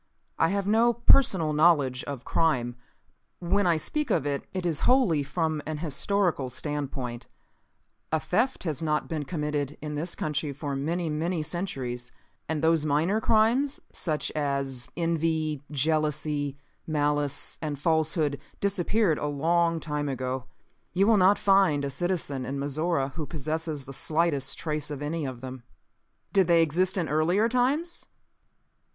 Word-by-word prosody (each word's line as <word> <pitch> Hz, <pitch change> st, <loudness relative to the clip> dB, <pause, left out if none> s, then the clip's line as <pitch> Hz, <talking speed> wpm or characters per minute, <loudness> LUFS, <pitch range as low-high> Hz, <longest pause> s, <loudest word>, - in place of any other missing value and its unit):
"I -, -, +5 dB
have 200 Hz, 0 st, -1 dB
no 225 Hz, +3 st, +4 dB
personal 200 Hz, -, +4 dB
knowledge 150 Hz, -5 st, +3 dB
of 140 Hz, -4 st, -6 dB
crime. 125 Hz, -7 st, +1 dB, 0.6 s
When 185 Hz, +2 st, +1 dB
I 170 Hz, -2 st, +3 dB
speak 300 Hz, -, -2 dB
of -, -, +1 dB
it, 140 Hz, -1 st, -2 dB
it 185 Hz, -2 st, -4 dB
is 160 Hz, -4 st, 0 dB
wholly 245 Hz, -, +4 dB
from 155 Hz, +1 st, -1 dB
an 155 Hz, -1 st, -3 dB
historical 165 Hz, -1 st, 0 dB
standpoint. 130 Hz, -2 st, -4 dB, 0.8 s
A 160 Hz, -, +2 dB
theft 245 Hz, +12 st, 0 dB
has 160 Hz, -3 st, -2 dB
not 150 Hz, -1 st, 0 dB
been 155 Hz, -3 st, -3 dB
committed 150 Hz, -2 st, -2 dB
in 150 Hz, 0 st, -5 dB
this 165 Hz, +4 st, -3 dB
country 150 Hz, -1 st, -2 dB
for 140 Hz, 0 st, -4 dB
many 165 Hz, +5 st, -1 dB
many 160 Hz, +2 st, -1 dB
centuries. 130 Hz, -8 st, -4 dB, 0.4 s
And 160 Hz, -1 st, -1 dB
those 160 Hz, -1 st, +3 dB
minor 160 Hz, +8 st, +1 dB
crimes, 235 Hz, +7 st, +2 dB
such 155 Hz, -3 st, -2 dB
as 140 Hz, -4 st, -2 dB
envy, 160 Hz, -3 st, 0 dB
jealousy, 150 Hz, -1 st, 0 dB, 0.3 s
malice 145 Hz, -2 st, 0 dB
and 150 Hz, -3 st, -3 dB
falsehood, 155 Hz, -1 st, +1 dB, 0.2 s
disappeared 200 Hz, -2 st, +1 dB
a 150 Hz, -, -2 dB
long 165 Hz, +3 st, +1 dB
time 150 Hz, -2 st, -2 dB
ago. 130 Hz, -1 st, -3 dB, 0.5 s
You 190 Hz, +3 st, +3 dB
will 220 Hz, 0 st, +5 dB
not 195 Hz, +2 st, +5 dB
find 190 Hz, -8 st, +3 dB
a 140 Hz, -, -2 dB
citizen 155 Hz, -4 st, -1 dB
in 135 Hz, +2 st, -4 dB
Mizora 145 Hz, +1 st, 0 dB
who 155 Hz, -4 st, -5 dB
possesses 155 Hz, -1 st, -3 dB
the 135 Hz, -, -9 dB
slightest 155 Hz, -2 st, +1 dB
trace 150 Hz, -2 st, -3 dB
of 145 Hz, -1 st, -5 dB
any 155 Hz, +1 st, -2 dB
of 130 Hz, -3 st, -6 dB
them. 130 Hz, -1 st, -7 dB, 0.7 s
"Did 195 Hz, -3 st, +4 dB
they 170 Hz, -1 st, +5 dB
exist 180 Hz, +5 st, +1 dB
in 170 Hz, -3 st, 0 dB
earlier 175 Hz, +8 st, +2 dB
times?" 270 Hz, +8 st, 0 dB
155 Hz, 145 wpm, -27 LUFS, 145-175 Hz, 0.8 s, I